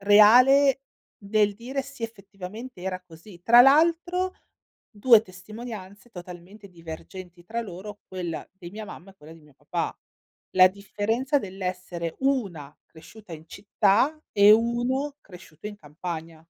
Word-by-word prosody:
reale 250 Hz, +7 st, +6 dB, 0.3 s
del 205 Hz, 0 st, +1 dB
dire: 250 Hz, +6 st, -4 dB
"Sì 275 Hz, -3 st, -13 dB
effettivamente 210 Hz, 0 st, -8 dB
era 185 Hz, 0 st, -4 dB
così". 175 Hz, +2 st, -15 dB
Tra 240 Hz, +3 st, +8 dB
l'altro 340 Hz, +6 st, +3 dB, 0.6 s
2 220 Hz, 0 st, +5 dB
testimonianze 210 Hz, +2 st, -10 dB
totalmente 180 Hz, +2 st, -11 dB
divergenti 175 Hz, +1 st, -11 dB
tra 230 Hz, +6 st, -4 dB
loro, 205 Hz, +1 st, -9 dB
quella 175 Hz, -4 st, -5 dB
di 180 Hz, -2 st, -11 dB
mia 215 Hz, +2 st, -8 dB
mamma 195 Hz, -1 st, -11 dB
e -, -, -20 dB
quella 155 Hz, -2 st, -14 dB
di 165 Hz, -, -16 dB
mio 150 Hz, -2 st, -22 dB
papà. -, -, -4 dB, 0.5 s
La 185 Hz, 0 st, +6 dB
differenza 215 Hz, +8 st, -1 dB
dell'essere 180 Hz, -5 st, -5 dB
una 195 Hz, -, -2 dB
cresciuta 185 Hz, +4 st, -15 dB
in 160 Hz, 0 st, -10 dB
città, 210 Hz, -, +1 dB
e 205 Hz, +1 st, +6 dB
uno 245 Hz, +5 st, 0 dB
cresciuto 175 Hz, -1 st, -13 dB
in 210 Hz, -1 st, -7 dB
campagna. 160 Hz, -1 st, -8 dB
200 Hz, 130 wpm, -25 LUFS, 180-235 Hz, 0.6 s, Tra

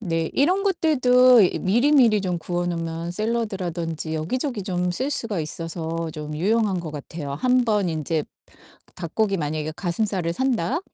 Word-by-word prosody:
네, 165 Hz, -5 st, -1 dB
이런 365 Hz, +8 st, +2 dB
것들도 255 Hz, -, +5 dB
이 180 Hz, -, +2 dB
미리미리 240 Hz, +1 st, +4 dB
좀 180 Hz, -2 st, -1 dB
구워 175 Hz, +1 st, -2 dB
놓으면 165 Hz, 0 st, -3 dB
샐러드라든지 180 Hz, -7 st, -3 dB
여기저기 235 Hz, -, -2 dB
좀 180 Hz, -2 st, -1 dB
쓸 265 Hz, +9 st, -2 dB
수가 230 Hz, -, -2 dB
있어서 165 Hz, +1 st, -4 dB
좀 150 Hz, -1 st, -6 dB
유용한 205 Hz, +2 st, +1 dB
것 170 Hz, -2 st, -5 dB
같아요. 145 Hz, 0 st, -6 dB
한 250 Hz, -, +2 dB
번 210 Hz, -5 st, +1 dB
인제 160 Hz, -1 st, -1 dB, 0.7 s
닭고기 195 Hz, +4 st, -1 dB
만약에 155 Hz, -1 st, -3 dB
가슴살을 185 Hz, -2 st, -1 dB
산다 260 Hz, -, 0 dB
180 Hz, 320 characters per minute, -23 LUFS, 165-235 Hz, 0.7 s, 것들도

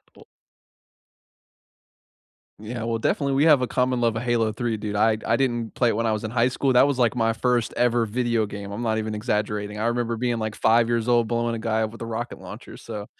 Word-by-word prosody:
We -, -, -16 dB, 2.3 s
Yeah, 110 Hz, +2 st, -6 dB
well, 115 Hz, 0 st, -1 dB
definitely, 140 Hz, +4 st, 0 dB
we 145 Hz, +3 st, +3 dB
have 150 Hz, -5 st, +6 dB
a 125 Hz, -, 0 dB
common 125 Hz, -1 st, 0 dB
love 115 Hz, -1 st, +1 dB
of -, -, -3 dB
Halo 115 Hz, -3 st, +1 dB
3, 115 Hz, +1 st, -2 dB
dude. 105 Hz, -1 st, -4 dB
I 110 Hz, +1 st, +3 dB
I 115 Hz, -, +2 dB
didn't 120 Hz, -4 st, -1 dB
play 120 Hz, -2 st, +2 dB
it 105 Hz, -, 0 dB
when 115 Hz, -, -1 dB
I 110 Hz, -, +2 dB
was 110 Hz, 0 st, -2 dB
in 110 Hz, -, -4 dB
high 120 Hz, +1 st, +2 dB
school. 130 Hz, 0 st, 0 dB
That 125 Hz, +3 st, +6 dB
was, 140 Hz, -, -1 dB
like, 120 Hz, -1 st, +2 dB
my 115 Hz, -1 st, +2 dB
first 120 Hz, 0 st, 0 dB
ever 120 Hz, -1 st, +2 dB
video 115 Hz, 0 st, 0 dB
game, 100 Hz, -1 st, -7 dB
I'm 105 Hz, +4 st, -5 dB
not 110 Hz, -2 st, 0 dB
even 110 Hz, -1 st, -3 dB
exaggerating. 105 Hz, -2 st, -2 dB
I 110 Hz, -, -1 dB
remember 120 Hz, -1 st, -1 dB
being, 120 Hz, -1 st, -1 dB
like, 110 Hz, -1 st, -3 dB
5 115 Hz, +1 st, +3 dB
years 115 Hz, 0 st, 0 dB
old 120 Hz, -2 st, +3 dB
blowing 120 Hz, 0 st, -1 dB
a 115 Hz, -, -5 dB
guy 110 Hz, 0 st, 0 dB
up 110 Hz, -, -3 dB
with 115 Hz, -, -13 dB
a -, -, -3 dB
rocket 115 Hz, +1 st, -5 dB
launcher, -, -, -10 dB
so 105 Hz, -1 st, -7 dB
115 Hz, 235 wpm, -24 LUFS, 110-120 Hz, 2.3 s, have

